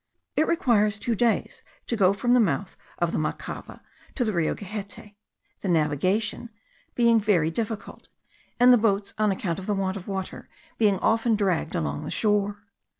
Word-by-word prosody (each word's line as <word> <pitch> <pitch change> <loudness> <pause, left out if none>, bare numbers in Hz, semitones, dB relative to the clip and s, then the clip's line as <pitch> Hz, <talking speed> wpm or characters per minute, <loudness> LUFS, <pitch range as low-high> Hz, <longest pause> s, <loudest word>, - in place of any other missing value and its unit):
It 310 - +2
requires 215 -10 +2
two 230 +3 -1
days 230 +1 0 0.2
to 235 - -1
go 195 -4 +4
from 240 +5 +1
the 250 - +5
mouth 200 -2 0 0.2
of 175 -1 0
the - - -1
Macava, 155 - -5 0.3
to 250 - 0
the 215 - -1
Rio 170 -3 0
Gehette, 205 +1 -8 0.5
the - - -5
navigation 185 - 0 0.5
being 235 -1 +4
very 180 -7 +2
difficult, 220 +2 -5 0.5
and 250 +1 +7
the 245 - +5
boats, 205 -2 0
on 215 -1 +3
account 185 -2 -2
of 190 - -8
the 205 - +1
want 195 0 -1
of 185 - -10
water, 190 -2 -5 0.3
being 205 -4 +3
often 225 +3 +2
dragged 185 -5 0
along 155 -3 -2
the 150 - -5
shore. 205 -1 0
205 Hz, 170 wpm, -25 LUFS, 185-225 Hz, 0.5 s, and